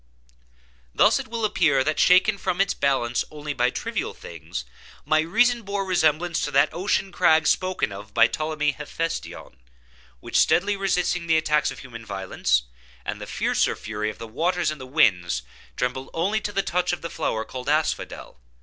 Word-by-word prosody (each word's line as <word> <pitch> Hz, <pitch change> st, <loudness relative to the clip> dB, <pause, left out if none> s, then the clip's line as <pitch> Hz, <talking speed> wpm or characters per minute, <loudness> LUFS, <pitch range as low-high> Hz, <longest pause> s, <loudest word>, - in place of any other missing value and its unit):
Thus -, -, +5 dB
it -, -, -6 dB
will 230 Hz, 0 st, -2 dB
appear 145 Hz, -10 st, +2 dB
that, 155 Hz, +2 st, -1 dB
shaken 195 Hz, +3 st, +5 dB
from 185 Hz, -1 st, -2 dB
its 195 Hz, -1 st, +2 dB
balance 130 Hz, -4 st, 0 dB
only 150 Hz, -1 st, -5 dB
by 125 Hz, -2 st, +2 dB
trivial -, -, -4 dB
things, 65 Hz, -, -7 dB, 0.4 s
my 155 Hz, -, +3 dB
reason 235 Hz, +9 st, +2 dB
bore 200 Hz, -1 st, -3 dB
resemblance 170 Hz, -2 st, +1 dB
to -, -, -1 dB
that 140 Hz, +1 st, +3 dB
ocean 190 Hz, +1 st, 0 dB
crag 160 Hz, -3 st, +4 dB
spoken 185 Hz, -, +1 dB
of 100 Hz, +2 st, -9 dB
by 115 Hz, +2 st, +5 dB
Ptolemy 155 Hz, +2 st, -1 dB
Hephestion, 150 Hz, -, -5 dB, 0.6 s
which -, -, 0 dB
steadily 200 Hz, +3 st, +3 dB
resisting 180 Hz, -3 st, 0 dB
the 160 Hz, -1 st, +4 dB
attacks 150 Hz, -1 st, +2 dB
of -, -, -7 dB
human 115 Hz, -3 st, -10 dB
violence, 95 Hz, -, 0 dB, 0.4 s
and -, -, -4 dB
the -, -, -7 dB
fiercer -, -, 0 dB
fury 105 Hz, 0 st, -4 dB
of 105 Hz, -, -8 dB
the 115 Hz, -, -7 dB
waters 170 Hz, +9 st, 0 dB
and 155 Hz, -3 st, -8 dB
the 130 Hz, -, -8 dB
winds, 90 Hz, -, +2 dB, 0.3 s
trembled 125 Hz, +1 st, -2 dB
only 200 Hz, +7 st, 0 dB
to 205 Hz, -, -3 dB
the 195 Hz, -1 st, 0 dB
touch 180 Hz, -1 st, 0 dB
of 175 Hz, -, -4 dB
the 170 Hz, -, -4 dB
flower 110 Hz, 0 st, -2 dB
called 130 Hz, +1 st, -6 dB
Asphodel. 155 Hz, -, -2 dB
155 Hz, 175 wpm, -24 LUFS, 125-180 Hz, 0.6 s, Thus